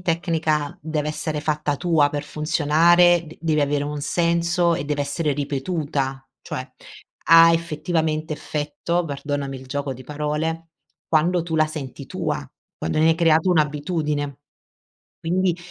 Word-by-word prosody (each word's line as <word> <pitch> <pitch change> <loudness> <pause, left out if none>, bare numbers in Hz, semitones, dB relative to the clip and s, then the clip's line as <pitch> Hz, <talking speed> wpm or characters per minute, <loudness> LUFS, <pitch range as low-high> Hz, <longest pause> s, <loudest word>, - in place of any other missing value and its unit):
tecnica 160 -4 0
deve 150 -1 -2
essere 155 0 -3
fatta 150 -1 -1
tua 160 -3 +3
per 145 0 -3
funzionare 165 +3 +3
d 160 - -12
deve 155 -2 +1
avere 145 0 +1
un 145 0 -4
senso 170 +2 +1
e 140 - -3
deve 145 0 -1
essere 145 +2 -1
ripetuta, 140 -2 -2
cioè, - - -5 0.6
ha 165 0 +8
effettivamente 160 -1 -1
effetto, 155 +4 -2
perdonami 145 -2 -4
il 130 - -13
gioco 140 +1 -3
di 130 0 -10
parole, 150 +3 -3 0.4
quando 170 +2 +2
tu 165 -1 -4
la 155 - +4
senti 140 -3 -7
tua, 155 - -3 0.3
quando 80 - -2
ne 160 +1 +4
hai - - +3
creato 165 +1 +3
un'abitudine, 150 -2 0 0.9
quindi 180 +1 +1
155 Hz, 140 wpm, -22 LUFS, 145-165 Hz, 0.9 s, ha